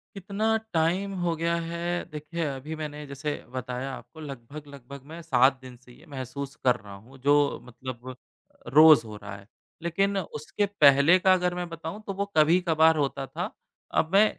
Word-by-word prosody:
कितना 205 Hz, +3 st, 0 dB, 0.2 s
टाइम 175 Hz, +5 st, +1 dB
हो 175 Hz, -1 st, 0 dB
गया 170 Hz, +1 st, 0 dB
है, 170 Hz, +1 st, -3 dB
देखिए 155 Hz, +2 st, -4 dB
अभी 140 Hz, +2 st, -5 dB
मैंने 150 Hz, -1 st, -6 dB
जैसे 140 Hz, +2 st, -4 dB, 0.2 s
बताया 130 Hz, +1 st, -4 dB
आपको 160 Hz, +4 st, -12 dB
लगभग-लगभग 140 Hz, -1 st, -10 dB
मैं 170 Hz, -, -8 dB
7 135 Hz, -4 st, +3 dB
दिन 130 Hz, -1 st, -11 dB
से 125 Hz, 0 st, -18 dB
ये 150 Hz, +6 st, -19 dB
महसूस 140 Hz, 0 st, -6 dB
कर 125 Hz, -2 st, +4 dB
रहा 105 Hz, -2 st, -12 dB
हूँ, 120 Hz, +7 st, -15 dB
जो 145 Hz, +2 st, +3 dB
मतलब 130 Hz, +1 st, -8 dB, 0.6 s
रोज़ 155 Hz, -5 st, +8 dB
हो 105 Hz, -1 st, -8 dB
रहा 105 Hz, -1 st, -8 dB
है। 100 Hz, 0 st, -16 dB, 0.4 s
लेकिन 195 Hz, +4 st, 0 dB
उसके 175 Hz, +3 st, -3 dB, 0.2 s
पहले 140 Hz, +6 st, +7 dB
का 190 Hz, +1 st, +4 dB
अगर 180 Hz, -1 st, 0 dB
मैं 180 Hz, 0 st, -4 dB
बताऊँ 165 Hz, +5 st, -7 dB
तो 195 Hz, -, -2 dB
वो 200 Hz, -, +1 dB
कभी-कभार 160 Hz, 0 st, +4 dB
होता 140 Hz, -2 st, -1 dB
था, 135 Hz, -, -4 dB, 0.4 s
अब 160 Hz, -, +1 dB
मैं 200 Hz, +2 st, +7 dB
150 Hz, 170 wpm, -27 LUFS, 130-170 Hz, 0.6 s, रोज़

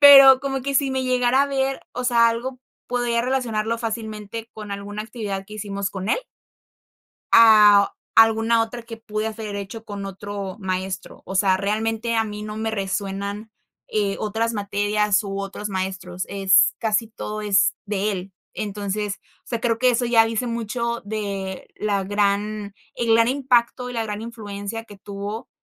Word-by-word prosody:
Pero 275 Hz, -2 st, +10 dB
como 270 Hz, -2 st, -2 dB
que, 280 Hz, +1 st, -2 dB
si 270 Hz, -1 st, +3 dB
me 260 Hz, 0 st, -1 dB
llegara 255 Hz, +1 st, +3 dB
a -, -, +1 dB
ver, 270 Hz, -1 st, -1 dB
o 250 Hz, +1 st, -4 dB
sea, 235 Hz, -2 st, +5 dB
algo 255 Hz, +3 st, -3 dB, 0.3 s
podría 240 Hz, -1 st, +1 dB
relacionarlo 230 Hz, -3 st, 0 dB
fácilmente 220 Hz, -1 st, -5 dB
con 210 Hz, -1 st, -9 dB
alguna 205 Hz, +1 st, -5 dB
actividad 210 Hz, -4 st, -5 dB
que 210 Hz, +2 st, -11 dB
hicimos 200 Hz, -2 st, -3 dB
con 190 Hz, 0 st, -5 dB
él. -, -, +2 dB, 1.1 s
Ah, 210 Hz, -3 st, +8 dB
o -, -, -44 dB, 0.2 s
alguna 225 Hz, +1 st, +5 dB
otra 235 Hz, +1 st, -5 dB
que 230 Hz, 0 st, -9 dB
pude 215 Hz, -1 st, -3 dB
haber 215 Hz, -2 st, -5 dB
hecho 200 Hz, +3 st, -7 dB
con 200 Hz, -2 st, -6 dB
otro 195 Hz, 0 st, -6 dB
maestro. 190 Hz, -1 st, -4 dB
O 190 Hz, -, -5 dB
sea, 190 Hz, -1 st, +4 dB
realmente, 220 Hz, +3 st, -1 dB
a 225 Hz, -1 st, +2 dB
mí 210 Hz, 0 st, -6 dB
no 210 Hz, 0 st, -6 dB
me 220 Hz, 0 st, -1 dB
resuenan, 200 Hz, +1 st, -3 dB, 0.4 s
eh, 205 Hz, -2 st, 0 dB
otras 225 Hz, +2 st, -1 dB
materias 205 Hz, +1 st, +1 dB
u 195 Hz, -1 st, -4 dB
otros 200 Hz, +1 st, -4 dB
maestros. 185 Hz, -1 st, -3 dB
Es 195 Hz, -1 st, +4 dB
casi 220 Hz, 0 st, 0 dB
todo 215 Hz, -1 st, -6 dB
es 200 Hz, -2 st, +3 dB
de 205 Hz, 0 st, -1 dB
él. 190 Hz, +1 st, -6 dB, 0.2 s
Entonces, 205 Hz, 0 st, -3 dB, 0.3 s
o -, -, -19 dB
sea, 235 Hz, -2 st, -2 dB
creo 230 Hz, -2 st, +1 dB
que 255 Hz, 0 st, +4 dB
eso 245 Hz, 0 st, +1 dB
ya 230 Hz, -1 st, +5 dB
dice 225 Hz, +2 st, -1 dB
mucho 235 Hz, +1 st, -2 dB
de 200 Hz, -3 st, -4 dB
la 200 Hz, -2 st, 0 dB
gran 205 Hz, +1 st, 0 dB, 0.2 s
el 230 Hz, -1 st, +1 dB
gran 230 Hz, +1 st, +5 dB
impacto 250 Hz, -2 st, +1 dB
y -, -, -6 dB
la 230 Hz, -1 st, -1 dB
gran 210 Hz, 0 st, -4 dB
influencia 220 Hz, -1 st, -6 dB
que 205 Hz, -3 st, -13 dB
tuvo, 205 Hz, +4 st, -6 dB
215 Hz, 170 wpm, -23 LUFS, 200-230 Hz, 1.1 s, Pero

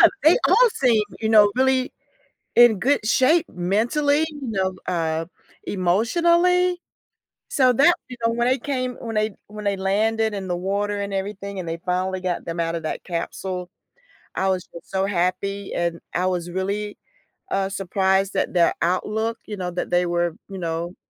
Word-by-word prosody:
Yeah, -, -, +10 dB, 0.2 s
they 315 Hz, +3 st, +6 dB
all -, -, +5 dB
seem, 235 Hz, -, +3 dB, 0.2 s
you 220 Hz, -, 0 dB
know, 210 Hz, -2 st, +6 dB
really 260 Hz, 0 st, +2 dB, 0.6 s
in 240 Hz, -4 st, +6 dB
good 270 Hz, -2 st, +1 dB
shape 310 Hz, +9 st, +3 dB
mentally, 240 Hz, -, +1 dB
you 290 Hz, -4 st, -8 dB
know, 190 Hz, -2 st, 0 dB
uh, 165 Hz, -2 st, -1 dB, 0.4 s
emotionally. 340 Hz, -, +2 dB, 0.7 s
So 255 Hz, -2 st, +4 dB
that, 285 Hz, +8 st, +5 dB
you 250 Hz, -, -8 dB
know, 230 Hz, -, +3 dB
when 240 Hz, +1 st, 0 dB
they 260 Hz, +1 st, +2 dB
came 255 Hz, -1 st, -2 dB
when 230 Hz, -1 st, -5 dB
they 215 Hz, -1 st, 0 dB
when 210 Hz, 0 st, -9 dB
they 200 Hz, -1 st, +1 dB
landed 215 Hz, +3 st, +1 dB
in 195 Hz, -2 st, -5 dB
the 175 Hz, -, -1 dB
water 200 Hz, +3 st, -1 dB
and 200 Hz, 0 st, -4 dB
everything 200 Hz, 0 st, -4 dB
and 175 Hz, -3 st, -5 dB
they 165 Hz, +1 st, -3 dB
finally 185 Hz, +1 st, -1 dB
got 180 Hz, -1 st, -2 dB
them 170 Hz, 0 st, -4 dB
out 165 Hz, 0 st, -1 dB
of 165 Hz, -, -3 dB
that 155 Hz, -, -4 dB
capsule, 180 Hz, +1 st, -4 dB, 0.7 s
I 190 Hz, 0 st, +1 dB
was 185 Hz, -2 st, 0 dB
just 170 Hz, -, -11 dB
so 190 Hz, 0 st, +1 dB
happy 195 Hz, +1 st, -1 dB
and 170 Hz, -1 st, -1 dB
I 180 Hz, +1 st, +1 dB
was 175 Hz, -1 st, -2 dB
really, 200 Hz, +3 st, -3 dB, 0.5 s
uh, 195 Hz, 0 st, 0 dB
surprised 195 Hz, 0 st, 0 dB
that -, -, -1 dB
their 175 Hz, -2 st, +4 dB
outlook, 215 Hz, +6 st, 0 dB
you 210 Hz, -, -6 dB
know, 180 Hz, -2 st, -3 dB
that 175 Hz, -, -3 dB
they 175 Hz, 0 st, +3 dB
were, 175 Hz, -1 st, 0 dB
you 195 Hz, -, -7 dB
know 170 Hz, +1 st, -3 dB
200 Hz, 175 wpm, -23 LUFS, 180-230 Hz, 0.7 s, Yeah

